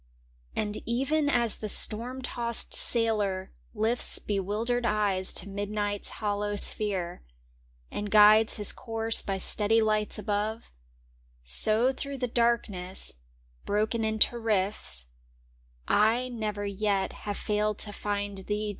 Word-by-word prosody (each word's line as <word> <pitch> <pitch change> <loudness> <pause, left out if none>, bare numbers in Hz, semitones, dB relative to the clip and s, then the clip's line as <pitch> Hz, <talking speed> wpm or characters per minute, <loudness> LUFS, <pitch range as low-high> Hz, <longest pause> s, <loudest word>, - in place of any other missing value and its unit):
And 210 0 -3
even 275 +5 0
as 235 -5 +3
the 215 - -2
storm 245 +6 +2
tossed 235 -2 -1
sailor 210 -5 +1 0.2
lifts 225 +3 +1
Bewildered 210 +5 -2
eyes 205 -4 0
to - - -5
midnight's 205 0 -3
hollow 205 -1 -3
sphere 195 -4 +2 0.7
And 205 0 -5
guides 215 +1 +6
his 210 -2 0
course 225 -2 +1
by 195 -1 -3
steady 210 +3 +1
lights 215 -1 0
above, 210 +2 -3 0.8
So 215 - +5
through 275 +1 -6
the 250 -1 -2
darkness, 215 - 0 0.5
broken 215 +2 -1
into 220 +2 +2
rifts, 195 - -2 0.8
I 230 +4 +2
never 210 -4 -4
yet 200 -1 -1
have 205 - -3
failed 210 0 -1
to 205 - -8
find 205 -1 -4
thee. 210 +2 -3
210 Hz, 120 wpm, -27 LUFS, 205-230 Hz, 0.8 s, guides